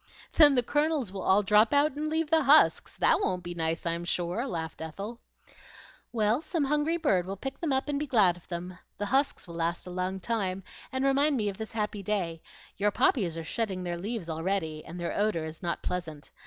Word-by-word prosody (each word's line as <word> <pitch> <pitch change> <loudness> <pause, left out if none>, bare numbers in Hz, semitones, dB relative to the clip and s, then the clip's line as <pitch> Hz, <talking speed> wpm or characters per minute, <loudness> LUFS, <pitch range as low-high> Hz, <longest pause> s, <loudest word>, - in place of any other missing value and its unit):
"Then 295 -3 +7
the 245 - +3
kernels 295 - 0
will 195 -1 -6
all 195 +3 +3
drop 210 +5 +4
out 290 +2 +4
and 300 +2 -3
leave 320 0 -1
the 320 -1 +5
husks; 290 +2 +5
that - - +3
won't 180 - -1
be 175 0 -5
nice, 165 0 -2
I'm 170 0 -1
sure," 180 +8 -2
laughed 160 -8 -5
Ethel. 200 +9 -6 0.9
"Well, 220 +3 +1
some 325 -1 -1
hungry 300 +4 +1
bird 195 - +1
will 195 - -4
pick 270 +7 -6
them 330 -4 -1
up 265 +1 0
and 285 -1 -1
be 300 - -3
glad 210 -9 +4
of 175 - -17
them. 180 +1 -6 0.2
The 205 - -2
husks 270 +1 +1
will 170 - -9
last 170 +1 -2
a 180 - -7
long 185 +1 -2
time 195 -3 -2 0.3
and 260 +1 -1
remind 280 +1 +3
me 210 -3 0
of 195 - -8
this 220 0 -6
happy 210 -2 -2
day; 180 -5 -2 0.4
your 205 +1 +2
poppies 200 - +1
are 165 - -4
shedding 190 0 -3
their 175 -1 -3
leaves 205 0 -4
already, 160 -1 -2
and 175 +2 -9
the 175 - -3
odor 205 -6 0
is 160 0 -8
not 170 -1 -3
pleasant. 165 -5 -5
200 Hz, 215 wpm, -28 LUFS, 175-270 Hz, 0.9 s, Then